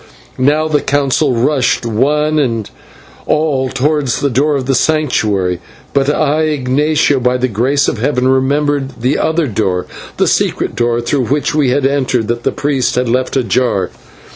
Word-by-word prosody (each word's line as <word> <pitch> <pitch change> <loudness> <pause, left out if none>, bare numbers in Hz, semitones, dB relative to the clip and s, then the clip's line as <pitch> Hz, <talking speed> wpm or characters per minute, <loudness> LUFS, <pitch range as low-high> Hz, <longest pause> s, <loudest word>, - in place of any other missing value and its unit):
Now 150 +4 +2
the 150 -2 +1
Council 140 -1 +1
rushed 125 0 +1
one 150 +7 +1
and 115 -7 -1 0.6
all 145 -4 +1
towards 140 -1 0
the 140 - 0
door 145 +5 +1
of 135 -2 -2
the 135 - +1
Sanctuary; 110 - 0 0.3
but 140 0 +2
I, 150 +1 +1
Ignatio, 145 0 +1
by 125 0 +1
the 125 0 0
grace 130 +6 +1
of 115 - -2
Heaven, 125 +1 0
remembered 135 0 0
the 130 +4 +1
outer 160 0 +1
door, 100 -6 -1 0.3
the - - +2
secret - - 0
door 120 0 0
through 125 +2 -1
which 145 +2 0
we 150 -4 +2
had 135 +2 +1
entered, 130 -5 0
that 120 0 -1
the - - 0
priest 140 -3 -1
had 125 0 0
left 130 +3 0
ajar. 120 -4 0
135 Hz, 165 wpm, -14 LUFS, 125-145 Hz, 0.6 s, Now